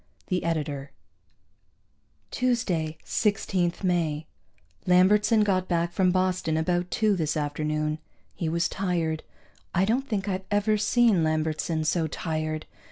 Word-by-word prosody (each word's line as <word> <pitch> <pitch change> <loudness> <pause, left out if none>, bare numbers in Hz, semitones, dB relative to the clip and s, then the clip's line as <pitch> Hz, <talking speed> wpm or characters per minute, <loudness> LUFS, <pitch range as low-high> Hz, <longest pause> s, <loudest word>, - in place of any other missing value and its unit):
The 180 -2 0
Editor.) 145 -4 -2 1.4
Tuesday, 185 -11 0
16 190 -4 +1
May. 165 -4 0 0.6
Lambertson 210 +5 +5
got 185 -3 +1
back 170 -1 0
from 185 +1 +2
Boston 185 -3 +1
about 175 +2 0
two 215 -3 +2
this 155 -3 -1
afternoon. 155 +1 -1 0.3
He 165 - -2
was 170 +1 +1
tired; 170 -4 -1 0.5
I 185 - +3
don't 250 +6 0
think 205 -3 -1
I've 190 -1 -2
ever 205 +1 +2
seen 215 -3 +3
Lambertson 155 0 0
so 160 0 +1
tired. 155 0 -3
175 Hz, 120 wpm, -26 LUFS, 155-195 Hz, 1.4 s, Lambertson